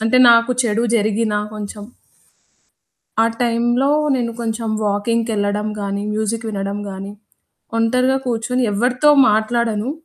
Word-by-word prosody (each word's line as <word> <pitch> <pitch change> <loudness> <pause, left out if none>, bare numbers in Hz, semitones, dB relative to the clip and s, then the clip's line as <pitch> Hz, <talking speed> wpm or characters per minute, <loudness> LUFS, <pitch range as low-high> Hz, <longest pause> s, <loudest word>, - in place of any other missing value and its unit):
అంటే 225 +3 +2
నాకు 230 +1 +4
చెడు 230 -1 0
జరిగినా 215 0 0 0.2
కొంచెం 210 0 -7 1.4
ఆ - - +4 0.2
టైంలో 240 +2 +1 0.3
నేను 235 -2 -1
కొంచెం 225 -1 -3
వాకింగ్‌కెళ్ళడం 210 0 -1
గాని, 200 0 -3
మ్యూజిక్ 220 +2 -2
వినడం 200 -1 -3
గాని, 195 +1 -7 0.6
ఒంటరిగా 250 +3 +2
కూర్చొని 250 +1 -1
ఎవరితో 250 +7 +2 0.2
మాట్లాడను. 220 +2 0
225 Hz, 110 wpm, -19 LUFS, 210-235 Hz, 1.4 s, నాకు